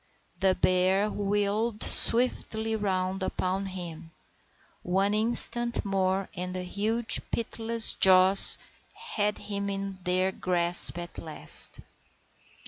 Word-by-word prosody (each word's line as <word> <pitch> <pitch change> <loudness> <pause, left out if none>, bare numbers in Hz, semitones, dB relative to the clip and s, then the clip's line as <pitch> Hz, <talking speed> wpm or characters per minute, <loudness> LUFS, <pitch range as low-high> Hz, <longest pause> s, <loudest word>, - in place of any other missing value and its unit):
The 190 -1 +1
bear 185 +3 0
wheeled 205 +2 -2
swiftly 225 -2 +3
round 190 -2 -3
upon 190 +1 -4
him. 170 -3 -9 0.7
One 195 +3 -1
instant 235 +2 +5
more, 190 -1 -2
and 180 0 -6
the 185 - -4
huge, 220 +5 -1
pitiless 230 0 -1
jaws 190 +1 +3 0.4
had 210 -1 -4
him 200 -1 -6
in 195 -1 -6
their 185 +1 -1
grasp 175 -2 +2
at 175 0 -9
last. 155 -2 -1
195 Hz, 105 wpm, -26 LUFS, 185-210 Hz, 0.7 s, instant